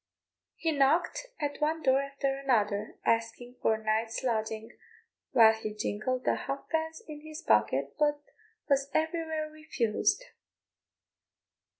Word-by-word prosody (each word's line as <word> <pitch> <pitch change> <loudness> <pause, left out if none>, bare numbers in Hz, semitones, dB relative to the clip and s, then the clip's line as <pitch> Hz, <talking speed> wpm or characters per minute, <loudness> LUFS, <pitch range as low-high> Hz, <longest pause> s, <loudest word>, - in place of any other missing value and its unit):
He 325 - 0
knocked 310 - +2
at 290 -1 -3
one 315 +2 0
door 265 0 +4
after 275 0 -2
another 215 -6 0
asking 230 +2 -1
for 220 - +3
a 220 - -9
night's 220 +2 0
lodging, 220 -1 -2 0.5
while 220 -1 +7
he 215 -1 -5
jingled 215 +4 -2
the - - +2
halfpence 320 +6 -3
in 300 -1 -8
his 310 0 -9
pocket, 110 +6 +2
but 295 -1 +2 0.5
was 275 -1 +2
everywhere 320 -1 -1
refused. 310 - 0
270 Hz, 120 wpm, -30 LUFS, 220-310 Hz, 0.5 s, while